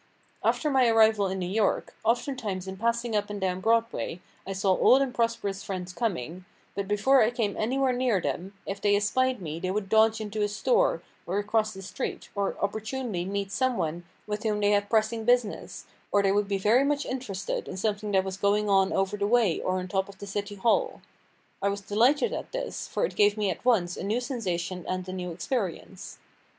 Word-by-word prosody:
After 300 - +1
my 260 -2 +4
arrival 220 -3 +4
in 190 0 -3
New 185 - -2
York, 200 +3 0
oftentimes 225 -5 -1
in 190 0 -6
passing 235 +1 0
up 205 0 0
and 205 -1 -4
down 185 -1 -1
Broadway 230 -4 0 0.3
I 195 - -3
saw 195 0 +1
old 260 - +6
and 270 -2 0
prosperous 230 -5 -1
friends 185 -2 -5
coming, 180 - -3 0.3
but 200 -1 -3
before 210 +7 +4
I 215 - +4
came 225 -4 -1
anywhere 260 +3 +1
near 245 -5 +1
them, 170 +6 -3
if 195 0 -5
they 205 -1 +4
espied 250 +2 +1
me 160 0 -4
they 185 +1 -2
would 195 0 -2
dodge 220 +1 +4
into 215 0 -4
a 205 - +3
store, 205 -5 +1 0.2
or 185 +3 -1
across 215 +1 +1
the 195 -2 -9
street, 190 - -5
or 200 -1 -1
opportunely 220 -2 -2
meet 200 0 -3
some 260 +1 +1
one 165 +2 -2 0.2
with 210 0 -3
whom 215 -2 0
they 205 0 +3
had 205 0 +2
pressing 220 0 +1
business, 245 -2 0 0.3
or 205 - +3
they 195 - +3
would 205 0 +1
be 200 -1 0
very 215 +7 +4
much 285 0 0
interested 225 -7 -4
in - - -6
something 210 +1 -1
that 190 -1 +4
was 190 0 -5
going 205 +1 +2
on 195 -1 +4
over 195 +2 0
the 200 0 0
way 225 -6 +3
or 185 0 0
on 185 0 -4
top 190 +1 -1
of 195 - -12
the 200 - -8
City 205 +1 -4
Hall. 465 - +1 0.6
I 200 - +2
was 200 0 -3
delighted 255 - +2
at - - -6
this, - - -4
for - - 0
it - - -6
gave 205 0 +4
me 205 -3 +1
at 170 - -7
once 195 -9 +2
a - - -5
new 210 +5 0
sensation 185 -8 -3
and 185 0 -3
a 185 - -5
new 180 -1 -4
experience. 185 +2 -4
205 Hz, 210 wpm, -27 LUFS, 190-230 Hz, 0.6 s, old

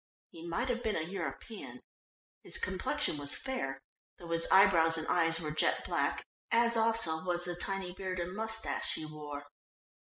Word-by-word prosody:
He 165 +1 -9
might 235 +10 -1
have 245 -1 0
been 220 -3 0
a 155 - 0
European; 190 +5 -6 0.6
his - - -6
complexion 225 - -1
was 145 0 -1
fair, 255 - -3 0.4
though 170 -1 -9
his 165 0 +1
eyebrows 170 -4 +6
and 160 - -1
eyes 165 -1 +2
were 155 -2 -3
jet 155 - +1
black, - - 0 0.2
as 235 0 +4
also 225 -8 +3
was 175 -1 0
the 175 - -2
tiny 190 0 -3
beard 185 -1 -4
and 175 +2 -3
moustache 225 +1 -1
he 155 - -2
wore. 150 -2 -7
180 Hz, 165 wpm, -33 LUFS, 160-220 Hz, 0.6 s, eyebrows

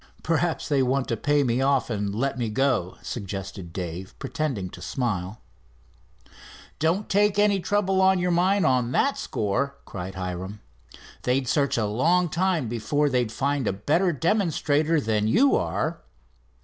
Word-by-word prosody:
"Perhaps 165 +1 0
they 140 -2 +2
want 130 +1 +1
to 115 - +1
pay 145 +5 +2
me 125 0 +1
off 135 -3 +1
and 100 -2 -2
let 135 +5 0
me 120 -3 -2
go," 120 -6 0
suggested 95 -4 -6
Dave, 90 +1 -6
pretending 145 - -3
to - - -11
smile. 105 -5 -3 1.4
"Don't 170 +7 +1
take 205 0 +2
any 205 -1 +3
trouble 195 0 +1
on 190 0 +5
your 180 0 0
mind 185 +2 +3
on 125 -3 +2
that 280 - +2
score," 110 +7 -2
cried 95 0 -7
Hiram. 95 +2 -5 0.6
"They'd 130 +1 0
search 140 0 +1
a 110 - +1
long 165 +12 +2
time 175 -5 0
before 120 +6 0
they'd 125 -3 +1
find 140 0 -1
a - - +1
better 155 - +1
demonstrator 160 -2 +1
than 110 -4 0
you 255 - +4
are." 160 +2 -1
135 Hz, 150 wpm, -25 LUFS, 105-170 Hz, 1.4 s, on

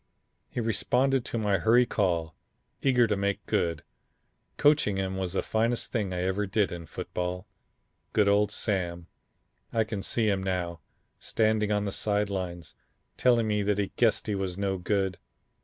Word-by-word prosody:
He - - -4
responded 125 +4 +1
to - - -3
my 105 -4 +1
hurry 120 +7 +5
call, 85 -8 0 0.5
eager 125 -3 +4
to 105 -2 +1
make 100 0 -1
good. 85 -3 0 0.7
Coaching 145 -9 +3
him 95 0 -2
was 95 -2 -3
the - - 0
finest 115 +2 0
thing 105 -5 -1
I 90 0 -2
ever 95 +2 0
did 100 0 +1
in 85 -1 -7
football. 90 +3 -4 0.7
Good 105 -2 +3
old 100 +1 +3
Sam, 85 -5 -2 0.7
I 115 - +2
can 105 -2 -4
see 110 +2 0
him 100 -2 +1
now, 90 -3 -2 0.4
standing 110 -1 +1
on 105 0 +1
the 100 - -2
side 105 0 0
lines 90 -3 -4 0.4
telling 120 -3 +3
me 105 -1 +1
that 100 0 +1
he 100 -2 -1
guessed 115 -3 +2
he 105 - -1
was 95 -2 -2
no 100 -1 -1
good. 95 -1 0
100 Hz, 165 wpm, -28 LUFS, 95-110 Hz, 0.7 s, hurry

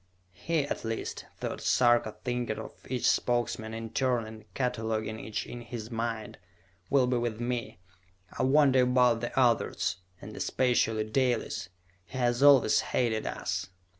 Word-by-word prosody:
"He, 160 - -1
at - - -4
least," 115 0 -4
thought - - -4
Sarka, 120 -3 +3
thinking 120 -3 -2
of - - -7 0.2
each 125 -1 0
Spokesman 120 -2 0
in 115 0 -6
turn 125 -2 +1
and 110 0 -12
cataloguing 110 -4 -2
each 110 -1 -4
in 120 - -8
his 115 -1 -7
mind, 115 -2 -3 0.5
"will 135 -2 +4
be 125 0 +1
with 120 -2 -2
me. 120 -3 -3 0.6
I - - -2
wonder 135 0 +5
about 125 -2 +3
the 120 +2 -2
others, 120 -7 +2 0.2
and 105 +1 -10
especially 115 -4 +1
Dalis. 120 -5 -1 0.4
He 85 - -9
has 120 0 +1
always 140 -6 +6
hated 115 -3 0
us!" - - -3
120 Hz, 145 wpm, -29 LUFS, 110-125 Hz, 0.6 s, always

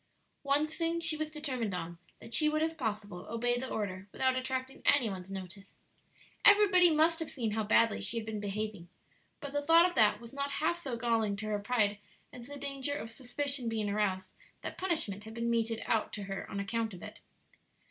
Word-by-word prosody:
One 280 +2 +2
thing 330 +2 -2
she 320 -1 +2
was 310 0 -3
determined 260 -10 -2
on 170 -1 -6 0.2
that 230 - -11
she 305 -1 +5
would 310 +1 +1
if 320 0 -1
possible 210 - -4
obey 240 +2 0
the 260 +1 -4
order 195 -2 -4
without 260 -1 +1
attracting 260 +1 -3
any 250 -7 +4
one's 185 -1 -7
notice. 195 +1 -8 0.7
Everybody 400 -4 +7
must 320 +1 +3
have 325 - -4
seen 230 -6 -2
how 220 +1 0
badly 225 +1 +3
she 235 - -1
had 225 - -3
been 220 -1 -4
behaving, 205 -3 -4 0.5
but 285 -2 -6
the 290 - 0
thought 330 +3 +6
of 360 - -5
that 215 -5 +4
was 235 +1 -12
not 280 0 -3
half 335 +4 0
so 265 -8 -4
galling 225 -3 +1
to 210 +2 -6
her 210 -1 0
pride 205 -2 +1 0.3
as 240 -1 -9
the 285 0 -8
danger 280 0 -2
of 225 -5 -6
suspicion 265 +1 -2
being 215 -2 -1
aroused 190 -3 -1 0.3
that - - -5
punishment 220 - -2
had 220 0 -9
been 235 0 -1
meted 230 -1 0
out 220 -2 +1
to 205 - -4
her 195 0 -5
on 200 - -4
account 220 +1 -2
of 175 - -11
it. - - -9
235 Hz, 205 wpm, -32 LUFS, 210-285 Hz, 0.7 s, Everybody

